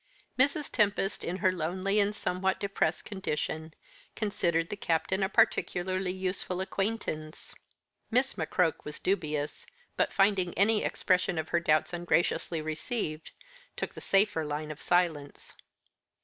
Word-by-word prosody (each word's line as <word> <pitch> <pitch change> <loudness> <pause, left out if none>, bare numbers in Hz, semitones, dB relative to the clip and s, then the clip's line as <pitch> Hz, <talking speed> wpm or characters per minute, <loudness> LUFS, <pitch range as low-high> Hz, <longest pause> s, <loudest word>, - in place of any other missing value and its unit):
Mrs. 280 +3 +2
Tempest, 205 -2 +1
in 180 - -2
her 185 - +6
lonely 185 +4 0
and 205 +1 +2
somewhat 190 -1 0
depressed 195 -5 0
condition, 160 -5 -3 0.4
considered 170 -6 0
the - - -3
Captain 185 +1 0
a 190 - +2
particularly 185 -1 +1
useful 185 -1 -3
acquaintance. 190 -5 -3 0.6
Miss 250 +3 +2
McCroke 170 -4 0
was 150 - -6
dubious, 155 -6 -2 0.3
but - - +2
finding 195 -3 +2
any 210 +3 +3
expression 185 -1 +1
of 160 0 -2
her 170 - +2
doubts 155 +1 +2
ungraciously 175 -1 0
received, 155 0 -3 0.5
took - - -3
the - - -9
safer 195 -4 +3
line 150 +1 -3
of 150 - -9
silence. 165 -5 0
185 Hz, 130 wpm, -30 LUFS, 160-200 Hz, 0.6 s, her